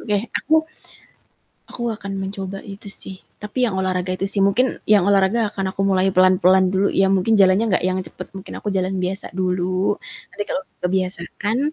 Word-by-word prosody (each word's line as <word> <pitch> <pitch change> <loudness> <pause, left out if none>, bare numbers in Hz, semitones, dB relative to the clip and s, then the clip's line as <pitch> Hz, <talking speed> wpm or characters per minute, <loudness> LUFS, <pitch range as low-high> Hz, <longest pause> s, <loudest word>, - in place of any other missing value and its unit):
Oke 210 -2 0 0.2
aku, 310 - 0 1.1
aku - - -9 0.2
akan 200 -1 -7
mencoba 195 0 -5
itu 200 +1 -9
sih 195 -1 -8 0.2
tapi 240 +4 -1
yang 190 - -3
olahraga 185 -1 -1
itu 195 - -3
sih. 200 0 -1
Mungkin 215 +7 +2
yang 205 -3 +5
olahraga 200 +2 +2
akan 190 -1 -3
aku 195 - 0
mulai 190 -1 +3
pelan-pelan 185 0 +4
dulu 195 +1 +2
ya, 195 0 +2
mungkin 195 +4 +3
jalannya 195 +2 +5
nggak - - -4
yang 185 0 0
cepet 185 +1 -9
mungkin 195 0 -9
aku - - -5
jalan 190 0 -1
biasa 185 +2 -3
dulu. 185 +1 0 0.3
Nanti 205 - -3
kalau - - -2 0.2
kebiasaan 185 +4 -2
190 Hz, 175 wpm, -21 LUFS, 185-200 Hz, 1.1 s, yang